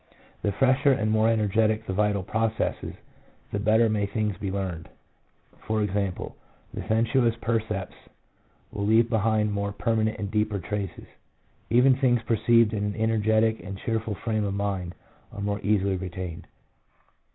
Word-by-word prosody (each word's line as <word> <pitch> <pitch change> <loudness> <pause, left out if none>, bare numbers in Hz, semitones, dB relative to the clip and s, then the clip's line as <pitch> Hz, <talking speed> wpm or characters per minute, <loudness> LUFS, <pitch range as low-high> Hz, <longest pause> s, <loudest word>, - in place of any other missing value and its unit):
The 105 - 0
fresher 135 +6 +3
and 110 -4 0
more 110 +1 +3
energetic 110 0 +1
the 95 - -3
vital 105 0 +1
processes, 110 +3 -2 0.6
the 100 - -2
better 110 +2 +4
may 105 -2 0
things 105 0 -1
be 100 0 -4
learned 95 -4 -4 0.4
— - - -26
i.e., 110 -1 +1
the 100 -2 -5
sensuous 115 +1 +2
percepts 110 -5 -2 0.8
will 100 - -4
leave 115 +2 +4
behind 110 -1 +1
more 100 0 -2
permanent 110 +1 0
and 100 -1 -4
deeper 105 -1 0
traces; 100 0 -5 0.6
even 125 +3 +5
things 125 -3 +2
perceived 115 0 +3
in 105 -1 -1
an 105 0 -2
energetic 110 0 +2
and 95 +1 -6
cheerful 110 0 -2
frame 110 +1 -2
of 100 -1 -2
mind 95 -3 -3 0.4
are 100 - -7
more 100 0 -1
easily 100 -1 +1
retained. 90 -2 -6
105 Hz, 145 wpm, -26 LUFS, 100-115 Hz, 0.8 s, even